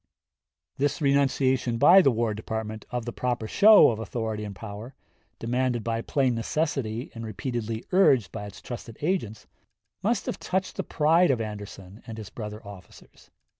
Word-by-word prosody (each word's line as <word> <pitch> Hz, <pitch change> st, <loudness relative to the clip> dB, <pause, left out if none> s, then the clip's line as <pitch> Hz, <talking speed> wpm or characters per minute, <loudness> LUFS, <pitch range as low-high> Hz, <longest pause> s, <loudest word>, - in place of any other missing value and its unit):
This 145 Hz, +3 st, 0 dB
renunciation 135 Hz, -4 st, +2 dB
by 170 Hz, +9 st, +8 dB
the 140 Hz, -, +4 dB
War 115 Hz, -2 st, 0 dB
Department 110 Hz, 0 st, -5 dB
of 125 Hz, -2 st, -3 dB
the 120 Hz, -, -5 dB
proper 120 Hz, -3 st, -2 dB
show 210 Hz, -, +7 dB
of 110 Hz, -, -5 dB
authority 110 Hz, -2 st, -4 dB
and 100 Hz, -2 st, -7 dB
power, 110 Hz, +5 st, -9 dB, 0.4 s
demanded 125 Hz, 0 st, -1 dB
by 115 Hz, 0 st, -1 dB
plain 130 Hz, 0 st, +1 dB
necessity 120 Hz, -1 st, -2 dB
and 115 Hz, -, -7 dB
repeatedly 115 Hz, 0 st, -4 dB
urged 140 Hz, -, +4 dB
by 105 Hz, -2 st, -6 dB
its 100 Hz, -, -12 dB
trusted 115 Hz, -2 st, -8 dB
agents, 145 Hz, -, -2 dB, 0.6 s
must 225 Hz, +5 st, 0 dB
have -, -, -4 dB
touched 190 Hz, +1 st, -2 dB
the -, -, -1 dB
pride 165 Hz, +3 st, +3 dB
of 130 Hz, -4 st, +2 dB
Anderson 105 Hz, -2 st, -7 dB
and 115 Hz, -1 st, -7 dB
his 110 Hz, -2 st, -8 dB
brother 105 Hz, 0 st, -7 dB
officers. 100 Hz, -2 st, -14 dB
115 Hz, 160 wpm, -26 LUFS, 110-140 Hz, 0.6 s, by